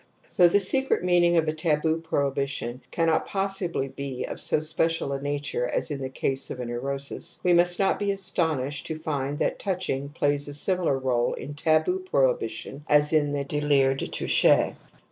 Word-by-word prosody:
Though 180 - +7
the 190 +4 +3
secret 265 +3 +1
meaning 175 -1 +3
of 160 -1 +2
a 155 - 0
taboo 160 0 0
prohi 140 -4 -1
bition 135 -3 -3
cannot 165 -1 +1
possibly 195 -7 -1
be 135 -1 -5
of - - -7
so - - +1
special 160 -1 0
a 135 - -4
nature 145 -3 -2
as 155 - -2
in 140 -2 -4
the 130 - -3
case 135 +1 -1
of 125 - -6
a 125 - -4
neurosis, 135 +4 -4
we 180 - +4
must 175 +1 +4
not 195 - +1
be 205 - -1
astonished 160 -8 -1
to 160 - -4
find 145 -2 -3
that - - -1
touching 175 -8 -2
plays 145 0 0
a 145 - -4
similar 175 -2 +1
role 125 -2 0
in 145 - -7
teboo 160 - +1
prohibition 480 - -1
as 150 +1 +4
in 150 -2 +3
the 145 -1 -2
(Ulire 140 -2 +2
de\ - - -4
toucher. - - +3
150 Hz, 185 wpm, -26 LUFS, 140-175 Hz, -, Though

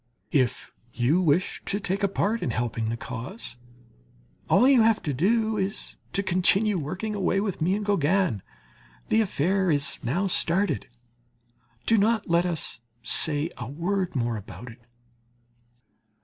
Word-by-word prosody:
If 130 -5 0 0.2
you 135 +9 +2
wish 170 +2 +1
to 200 - -1
take 195 0 -2
a 200 - +3
part 210 +3 -1
in - - -1
helping 115 -2 -2
the 115 - -3
cause, 125 - -6 0.9
all 250 - +5
you 265 -4 +6
have 225 -1 +3
to 145 - -2
do 220 - +1
is 195 +1 -3 0.2
to 200 - 0
continue 190 +2 +2
working 185 +9 -4
away 195 -1 0
with 195 -5 -3
me 180 +5 +2
and 210 0 -3
Gauguin; 185 - +1 0.7
the 225 - +3
affair 190 -1 0
is 145 -3 +1
now 170 +12 0
started; 190 +1 0 1.0
do 225 -1 +3
not 220 +1 +1
let 170 +1 +2
us 160 -8 -1 0.2
say 150 +6 +4
a 120 - -5
word 180 +5 -2
more 120 -3 -1
about 115 +4 -10
it. 115 - -17
180 Hz, 150 wpm, -25 LUFS, 140-200 Hz, 1.0 s, you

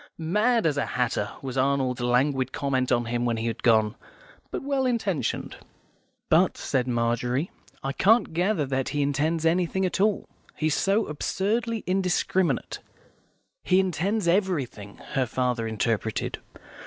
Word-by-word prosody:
"Mad 210 +8 +1
as 150 -3 +1
a 140 - +1
hatter," 115 -4 0
was 130 -1 -3
Arnold's 130 -2 +1
languid 130 +2 +1
comment 130 -3 -1
on 120 -1 +2
him 120 +1 -1
when 120 -1 0
he 115 - -3
had 115 -1 -3
gone; 110 -2 +3 0.6
"but - - -5
well 270 -2 0
intentioned." 210 - -1 0.7
"But," - - +3
said 130 -1 -1
Margery, 120 +5 0 0.3
"I 135 0 -2
can't 220 - +3
gather 175 -2 +1
that 135 -1 -1
he 145 -1 0
intends 155 +4 0
anything 180 +3 +1
at 185 +1 -1
all. 210 0 +1 0.3
He's 155 -1 0
so 200 +6 +2
absurdly 215 +9 -1
indiscriminate." 185 -1 0 0.8
"He 185 0 +3
intends 190 +2 0
everything," 160 - -1
her 130 -3 0
father 125 -1 -1
interpreted. 110 0 -1
145 Hz, 140 wpm, -26 LUFS, 125-190 Hz, 0.8 s, gone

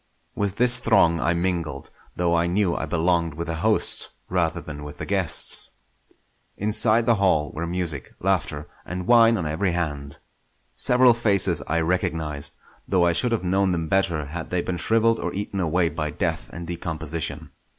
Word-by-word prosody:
With 100 -1 -2
this 125 +2 +6
throng 85 -7 +3
I 85 +1 +1
mingled, 85 -5 -3 0.2
though 85 -1 +1
I 85 +1 +2
knew 90 0 +1
I - - -3
belonged 85 -2 0
with 85 +1 -4
the 80 -1 -4
hosts - - 0 0.2
rather 85 -2 0
than 75 -3 -8
with 75 0 -9
the - - -5
guests. 95 -7 +2 0.9
Inside 110 +2 +3
the 115 -2 +3
hall 80 -6 +2
were 85 +2 -4
music, 85 -6 -4
laughter, 85 -6 -1 0.2
and 90 0 -5
wine 115 0 +5
on 85 - -3
every 85 +4 -1
hand. 70 -5 -4 0.6
Several 125 0 +4
faces 100 -8 +1
I 85 +2 0
recognised; 80 -4 -2 0.3
though 90 -2 +2
I 85 - +3
should 120 +8 +1
have 115 -5 -1
known 95 +1 +1
them 85 -2 -2
better 85 -4 0
had 80 +3 -7
they 90 -1 -1
been 90 - -3
shrivelled 115 +3 +2
or - - -3
eaten 100 0 -4
away 90 0 +1
by 75 -1 -3
death - - -3
and 85 0 -7
decomposition. 80 -2 -4
85 Hz, 170 wpm, -24 LUFS, 80-100 Hz, 0.9 s, this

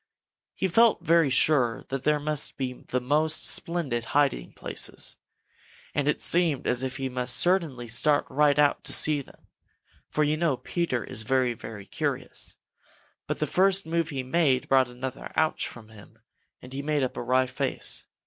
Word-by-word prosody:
He 190 - 0
felt 225 +5 +4 0.3
sure 130 -3 +3
that 135 -1 -3
there 150 0 +3
must 150 0 -2
be 130 -2 -2
the 125 0 -4
most 150 +5 +1
splendid 150 -9 -1
hiding 140 - +1
places, - - -4 0.8
and 145 -1 0
it 150 - +1
seemed 165 -6 +2
as 125 0 +1
if 130 0 -3
he 135 -1 -2 0.2
certainly 145 -2 +2
must 115 0 -2
start 150 -1 +2
right 145 0 +2
out 145 -1 +3
to - - +2
see 150 -2 +5
them, - - -18 0.6
for 155 - +1
you 150 +1 +1
know 155 -5 +1
Peter 145 - -2
is 110 - -2
very, 125 +1 +1
very 105 -3 -9
curious. - - -4 0.7
But - - -2
the - - 0
first 195 +1 +3
move 165 0 -1
he 135 -4 -3
made 130 -1 +1
brought 130 -1 +4
another 125 +1 -7
"Ouch" 155 0 +1
from 110 -2 -11
him, 105 -2 -16 0.5
and 125 - -11
he 135 - -3
made 150 -1 0
up 130 - -2
a - - -4
wry 130 +2 +2
face. 125 - -2
140 Hz, 170 wpm, -26 LUFS, 125-155 Hz, 0.8 s, see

